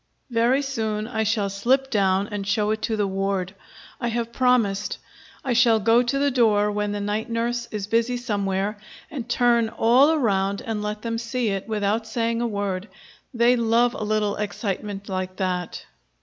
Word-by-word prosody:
Very 240 +4 +2
soon 220 -5 -2
I 225 -2 -2
shall 215 -1 +1
slip 260 +7 +1
down 195 -1 +2
and 200 -1 -4
show 210 0 +1
it 220 0 -2
to 220 0 -1
the 205 - +1
ward. 195 -1 -2 0.5
I 235 - -1
have 235 0 -2
promised. 225 -6 +1 0.5
I 255 - +1
shall 235 -2 +4
go 225 +3 +4
to 250 +2 -1
the 280 0 +2
door 210 -4 +3
when 210 0 -1
the 205 - -3
night 210 +3 -2
nurse 235 +1 -1
is 210 -2 -4
busy 230 +3 +1
somewhere, 205 -3 -2 0.3
and 250 -6 -6
turn 240 -2 +3
all 245 +7 +4
around 200 -10 +1
and 220 -2 -2
let 210 0 -4
them 230 -1 -2
see 235 0 -1
it, 195 0 -3
without 215 +1 -1
saying 230 +1 -1
a 240 - +1
word. 200 -2 -3 0.4
They 240 -1 +4
love 235 +1 +2
a 265 - -5
little 210 -1 0
excitement 205 -1 -4
like 185 -1 -3
that. 180 -2 -3
220 Hz, 180 wpm, -24 LUFS, 205-235 Hz, 0.5 s, shall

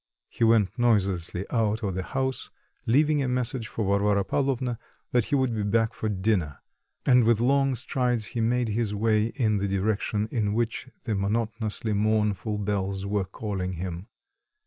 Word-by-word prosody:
He - - -3
went 115 -2 +3
noiselessly 95 -6 +1
out 110 -1 +1
of 100 -2 -1
the 95 - -2
house, 130 +6 -3 0.4
leaving 145 +5 +3
a 135 - 0
message 125 -1 -1
for 110 - -3
Varvara 100 0 +2
Pavlovna 130 -1 -1 0.3
that 120 -3 +2
he - - 0
would 130 -3 +1
be 110 - -1
back 110 +2 +1
to 110 - -1
dinner, 95 -8 0 0.5
and 125 -2 +6
with 115 -1 +3
long 135 +2 +2
strides 125 -2 0
he 120 - -1
made 120 +1 +1
his 105 -1 -1
way 110 0 +2
in 110 -6 +1
the 100 0 -1
direction 105 +2 0
in 105 -3 0
which 115 +2 -2
the 115 - -2
monotonously 110 +2 -1
mournful 105 -1 +1
bells 100 -1 -2
were 100 -1 0
calling 95 -2 -4
him. 90 +2 -5
110 Hz, 165 wpm, -26 LUFS, 100-120 Hz, 0.5 s, and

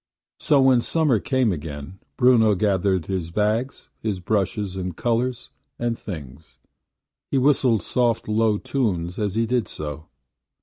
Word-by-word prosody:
So 145 - +3
when 130 -2 +5
summer 150 -5 +2
came 130 0 +1
again, 75 +2 -6 0.2
Bruno 115 -4 +5
gathered 95 -3 +1
his 90 -3 -3
bags, 110 +8 -1
his 105 -4 -2
brushes 100 0 -1
and 90 -3 -4
colors 120 +1 -1 0.3
and 120 -1 -1
things. 75 - -9 0.7
He 140 - 0
whistled 130 -6 +3
soft 120 +1 0
low 110 0 +2
tunes 95 -10 -2
as 105 -2 -1
he 115 +1 +2
did 120 0 0
so. 75 +1 -7
105 Hz, 135 wpm, -23 LUFS, 90-120 Hz, 0.7 s, when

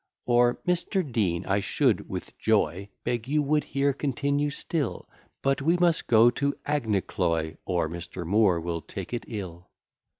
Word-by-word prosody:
Or, 120 0 +3
"Mr. 180 0 +1
Dean 95 -6 0
I 100 +1 +1
should 100 - +1
with - - -6
joy 95 +6 +1
Beg 120 -1 -2
you 150 +2 +2
would 150 +1 +2
here 140 +1 +1
continue 140 +1 0
still, 145 -1 -3 0.4
But 135 0 +1
we 165 +5 +3
must 175 -2 +2
go 115 +1 +6
to 140 +3 -1
Aghnecloy; 95 - 0
Or 90 -3 0
Mr. 85 +1 -6
Moore 95 -1 +3
will 85 0 -3
take 95 +6 -7
it 120 - -3
ill." 90 -6 -7
115 Hz, 155 wpm, -27 LUFS, 90-140 Hz, 0.4 s, go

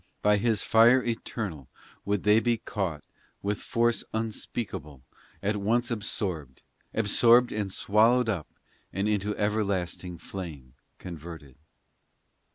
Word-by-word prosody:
by 105 0 +5
His 110 0 +1
fire 120 +3 +6
eternal 105 - -4 0.4
Would 100 -1 0
they 105 +1 +5
be 120 0 +1
caught, 90 -10 -3 0.4
with 100 +1 -1
force 120 0 +1
unspeakable, 100 - -4 0.4
At 105 +1 +1
once 120 +4 +1
absorbed, 90 - -3 0.3
Absorbed 115 +3 +4
and 105 -2 -2
swallowed 115 +6 +3
up 90 -9 -1 0.4
And 100 +3 -1
into 105 0 0
everlasting 95 -4 -1
flame 80 -8 -8 0.2
converted. 80 -5 -9
105 Hz, 110 wpm, -28 LUFS, 90-115 Hz, 0.4 s, fire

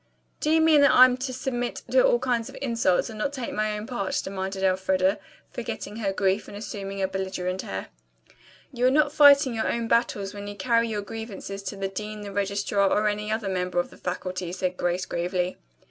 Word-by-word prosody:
"Do 300 - -1
you 320 +1 +4
mean 315 -2 +6
that 280 - +7
I'm 255 0 +8
to 260 +1 -3
submit 245 -1 -3
to - - +5
all - - +4
kinds 240 - -1
of - - -11
insults 230 -8 +1
and 215 - -9
not 280 - 0
take 255 -4 -4
my 215 0 -1
own 210 - -6
part?" 210 -6 -2
demanded 190 0 -4
Elfreda, 190 +1 +2 0.3
forgetting 210 - -5
her 205 -4 -1
grief 195 +1 0
and 205 - -8
assuming 195 -2 -5
a - - +2
belligerent 190 -1 -3
air. 95 0 -5 0.8
"You 250 0 +2
are - - +6
not 290 +2 +3
fighting 285 -3 +7
your 225 - 0
own 235 -1 -2
battles 210 -4 +1
when 205 0 -7
you 205 - -6
carry 230 +3 +2
your 210 -2 -3
grievances 200 -2 -7
to 200 - -5
the 195 0 -2
dean, 210 +2 -6
the 205 -1 -7
registrar, 200 0 +1
or 210 +2 +2
any 210 0 -2
other 220 -2 -1
member 180 -1 -2
of 175 - -2
the - - -13
faculty," 180 0 -4
said 185 0 -2
Grace 175 +1 -1
gravely. 180 +1 -2
205 Hz, 210 wpm, -26 LUFS, 190-235 Hz, 0.8 s, I'm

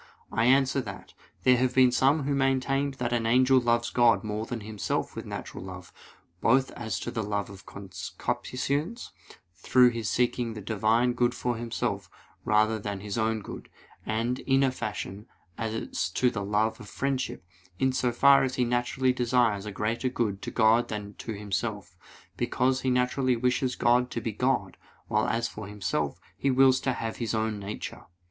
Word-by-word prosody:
I 115 - +1
answer 135 +1 +4
that, 100 -5 -9 0.3
There 125 -1 +5
have 125 0 +1
been 130 -1 +6
some 135 +4 +3
who 140 +1 0
maintained 135 +1 +1
that 120 -2 -2
an 115 -1 0
angel 130 +2 +5
loves 120 -1 +1
God 120 -1 +4
more 110 +1 -3
than 120 -2 -4
himself 105 0 -3
with - - -6
natural - - -6
love, 90 -1 -9 0.5
both 130 +3 +3
as 110 -6 -4
to - - -4
the 115 - -2
love 100 -1 -2
of 95 -1 -13
concupiscence, 125 - -4 0.4
through 125 +8 +4
his 115 -3 -3
seeking 120 -2 0
the - - -5
Divine 110 +4 +2
good 120 0 +1
for 125 -1 -1
himself 115 0 -3 0.3
rather 110 +1 +2
than 100 -1 -4
his 100 -1 -5
own 110 -1 0
good; - - -9 0.3
and, 115 +4 -1
in 135 0 +2
a 135 - +3
fashion, 105 -3 -5 0.3
as 110 -5 -3
to 125 -1 +2
the 105 -4 -3
love 110 +3 0
of 105 -4 -10
friendship, 135 -8 -2 0.3
in 130 +5 +1
so 125 -1 +1
far 140 +3 +6
as 130 -1 -1
he 125 - +1
naturally 125 +2 +1
desires 120 -5 +1
a - - -4
greater 110 +5 -1
good 105 -6 -2
to - - -4
God 115 +1 +3
than 105 -1 -5
to 115 - -5
himself; 100 -2 -4 0.4
because 130 +1 +1
he 130 - 0
naturally 125 +1 +2
wishes 125 +2 0
God 125 +1 +3
to - - -3
be 115 - -3
God, 105 -5 0 0.3
while - - +1
as 115 +1 0
for 110 -3 -8
himself, 85 -8 -2 0.2
he 140 - 0
wills 130 0 +5
to 130 - 0
have 115 -2 -4
his 115 -2 -2
own 110 -1 -1
nature. 100 +1 -7
120 Hz, 180 wpm, -28 LUFS, 105-130 Hz, 0.5 s, been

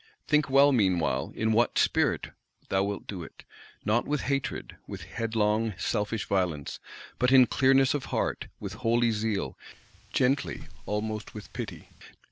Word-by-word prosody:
Think 150 -2 +3
well, 140 +2 +6
meanwhile, 95 - +1
in 110 0 +1
what 115 +2 +2
spirit - - +2 0.4
thou 95 0 +2
wilt 100 0 -4
do 95 -4 -6
it: 80 - -11 0.4
not 110 +3 +2
with 150 -1 0
hatred, 140 0 -2
with - - -7
headlong 110 -1 0
selfish 105 +3 -1
violence; 90 -7 -1 0.4
but 125 +1 +3
in 130 -1 +8
clearness 135 +1 +4
of 145 -2 -2
heart, - - -2
with 100 -2 -6
holy 120 0 +3
zeal, 105 -2 -1 0.6
gently, 135 +2 +1 0.2
almost 105 +1 -3
with 105 - -9
pity. - - -6
110 Hz, 140 wpm, -28 LUFS, 105-130 Hz, 0.6 s, in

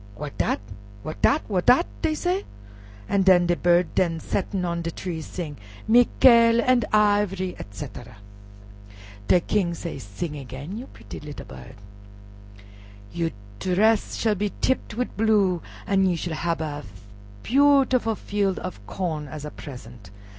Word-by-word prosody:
"What 150 +3 -7
dat? - - +1 0.4
What 155 - -7
dat? 300 - +3
What 185 -4 -1
dat?" 260 +8 +6 0.2
dey 315 -2 +1
say, 360 +5 -1 0.6
an' 200 - +2
de 175 -2 +5
bird 175 0 +2
den 165 -3 +1
settin' 190 +1 -2
on 170 -1 -2
de 165 - -3
tree 170 -1 -5
sing, 155 -3 -6 0.3
"Mikale 235 0 +6
an' 245 -1 +3
iv'ry," 205 -3 +2
etc. 105 +3 -9 1.1
De 180 - +5
King 175 -3 0
say, 165 -4 -6
"Sing 135 - -5
again, 135 +6 -7
you 245 +4 -7
pritty 100 -7 -11
lil' - - -9
bird. 65 -1 -11 1.4
You 170 -1 0 0.3
dress 210 - +2
shall 220 -2 +1
be 205 0 -2
tipped 260 -4 0
with 250 +2 -3
blue, 205 -5 +2 0.2
an' 195 -1 +3
you 175 -2 +1
shall 165 0 -4
hab 165 0 -1
a 150 -2 -4 0.6
beautiful 265 -4 +3
field 200 -2 -1
of 180 - -7
corn 160 -6 -3
as 150 +1 -7
a 150 - -6
present." 120 - -11
180 Hz, 145 wpm, -24 LUFS, 155-220 Hz, 1.4 s, dat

